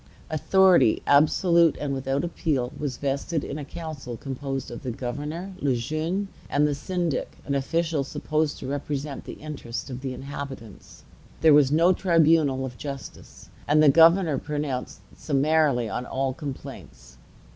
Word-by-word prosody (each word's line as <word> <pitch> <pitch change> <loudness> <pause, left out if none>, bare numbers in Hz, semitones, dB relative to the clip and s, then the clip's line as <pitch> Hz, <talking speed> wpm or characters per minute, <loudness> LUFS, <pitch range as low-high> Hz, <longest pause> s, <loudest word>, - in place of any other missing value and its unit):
Authority, 175 - +4
absolute 165 +3 +4
and 145 -2 -2
without 135 +2 -1
appeal, 145 -7 -1
was 140 -4 -4
vested 140 +3 -2
in 140 - -5
a - - -5
council 145 -5 -7
composed 135 0 -5
of 120 - -7
the 130 - -4
governor, 145 +9 -5
Le 135 -6 +1
Jeune, 155 - -2 0.2
and 145 +1 +2
the 150 - +1
syndic, 170 +1 -3
an 140 - -2
official 155 +2 0
supposed 155 +2 -1
to - - -7
represent 140 0 -4
the - - -7
interests 140 -4 -7
of 125 0 -6
the 135 -1 -3
inhabitants. 135 -6 -9 0.4
There 160 -2 +7
was 145 -2 +5
no 170 +4 +5
tribunal 160 -7 +3
of 125 -2 -8
justice, 140 -2 -9 0.2
and 150 +1 +4
the 150 - +7
governor 165 0 +5
pronounced 145 -4 -4
summarily 145 -4 +2
on 120 +5 -4
all 135 0 -1
complaints. 130 - -9
145 Hz, 145 wpm, -25 LUFS, 135-160 Hz, 0.4 s, There